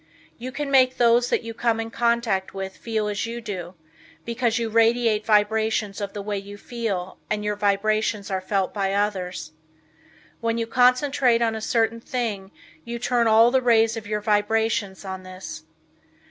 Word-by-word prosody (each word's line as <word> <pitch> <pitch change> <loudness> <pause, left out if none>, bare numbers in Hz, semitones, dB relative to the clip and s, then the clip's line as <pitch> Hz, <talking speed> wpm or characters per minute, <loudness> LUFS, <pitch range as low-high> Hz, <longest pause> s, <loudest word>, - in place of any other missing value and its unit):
You 255 +2 -6
can 280 +1 -4
make 260 -1 +4
those 240 +1 +4
that - - 0
you 230 0 -6
come 230 0 0
in 225 0 -4
contact 235 -6 0
with 190 0 -5
feel 220 -2 -2
as 205 +1 -2
you 235 +1 -5
do, 190 -6 -6 0.5
because 235 0 0
you 230 -1 -1
radiate 225 -1 +2
vibrations 215 -1 +1
of 200 -1 -4
the 205 - -5
way 205 -1 -2
you 200 +1 -10
feel 205 -6 -4
and 210 0 -2
your 210 0 0
vibrations 205 0 0
are 190 -1 -1
felt 190 0 -1
by 195 -2 -1
others. 185 -5 -2 0.9
When 230 0 -1
you 230 - -1
concentrate 250 0 +3
on 225 -1 +1
a 220 - -5
certain 230 0 +1
thing 220 -7 -3 0.3
you 235 0 -5
turn 235 -1 +1
all 225 +2 +6
the 260 0 +3
rays 225 -2 +3
of 220 -2 -7
your 210 0 -2
vibrations 210 -2 0
on 190 -1 -5
this. 185 -4 -9
220 Hz, 175 wpm, -24 LUFS, 200-235 Hz, 0.9 s, all